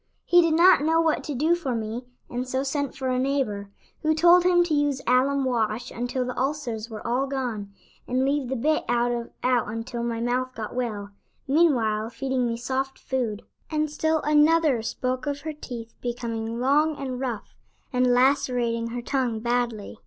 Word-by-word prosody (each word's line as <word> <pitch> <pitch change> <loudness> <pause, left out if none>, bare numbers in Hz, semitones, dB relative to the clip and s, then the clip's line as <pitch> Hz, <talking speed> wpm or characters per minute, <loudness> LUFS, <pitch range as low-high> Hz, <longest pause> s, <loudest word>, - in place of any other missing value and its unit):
"He 350 0 +6
did 330 -2 +2
not 345 -1 +6
know 320 +2 +3
what 325 -1 +1
to 295 - -3
do 310 +7 +2
for 295 -8 -1
me 225 +2 -4 0.2
and 250 +1 -4
so 260 +1 -1
sent 280 0 -2
for 260 -1 -3
a 255 0 +1
neighbor, 255 -7 -1 0.3
who 315 0 +2
told 345 +2 +6
him 355 -1 +4
to 345 -2 -2
use 290 -2 +1
alum 265 +2 +3
wash 230 -2 -1
until 245 +2 -2
the 250 - -4
ulcers 255 -5 -2
were 220 -2 -8
all 250 +4 0
gone, 240 -7 -3 0.4
and 255 +1 +1
leave 275 -2 0
the 265 - -1
bit 305 +6 +1
out 240 0 0 0.2
until 235 -1 -1
my 235 -1 -2
mouth 255 +2 -1
got 215 -2 -5
well, 215 -5 -3 0.4
meanwhile 240 -8 +2
feeding 255 +1 -1
me 230 0 -2
soft 265 +2 -2
food." 235 -5 -3 0.3
And 305 -1 -1
still 315 +1 +1
another 300 -3 +4
spoke 255 +4 -3
of 285 0 -2
her 315 0 -4
teeth 235 -6 -8
becoming 230 -1 -3
long 295 +5 +3
and 260 -3 -4
rough, 245 -5 -4 0.4
and 250 0 +3
lacerating 245 -2 +2
her 240 +1 -5
tongue 250 -4 -1
badly. 235 -2 -2
255 Hz, 175 wpm, -25 LUFS, 235-285 Hz, 0.4 s, He